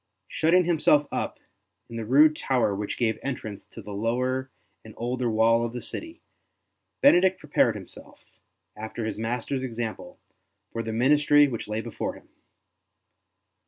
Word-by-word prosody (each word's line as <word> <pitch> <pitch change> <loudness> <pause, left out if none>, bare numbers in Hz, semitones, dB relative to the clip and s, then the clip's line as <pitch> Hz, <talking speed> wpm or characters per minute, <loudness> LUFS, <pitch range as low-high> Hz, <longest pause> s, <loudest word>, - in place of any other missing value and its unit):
Shutting 175 +3 +3
himself 150 -3 +3
up - - -3 0.5
in 115 - -10
the 115 -1 -4
rude 150 +6 +5
tower 125 -8 +1
which 105 +1 -4
gave 110 -3 0
entrance 110 -7 -5
to 115 - -11
the 105 - -9
lower 125 +5 -1 0.3
and 110 -1 -13
older 125 +1 -1
wall 115 +1 +3
of 120 0 -3
the 125 - -5
city, 330 +1 -7 0.8
Benedict 190 -8 +5
prepared 130 -6 +2
himself, 95 -3 -12 0.5
after 110 +1 -5
his 110 - -4
Master's 120 +4 -2
example, 115 -3 -5 0.5
for 115 - -3
the 110 0 -4
ministry 145 +5 +4
which 115 -6 -5
lay 105 +1 -2
before - - -5
him. - - -17
120 Hz, 145 wpm, -26 LUFS, 110-145 Hz, 0.8 s, rude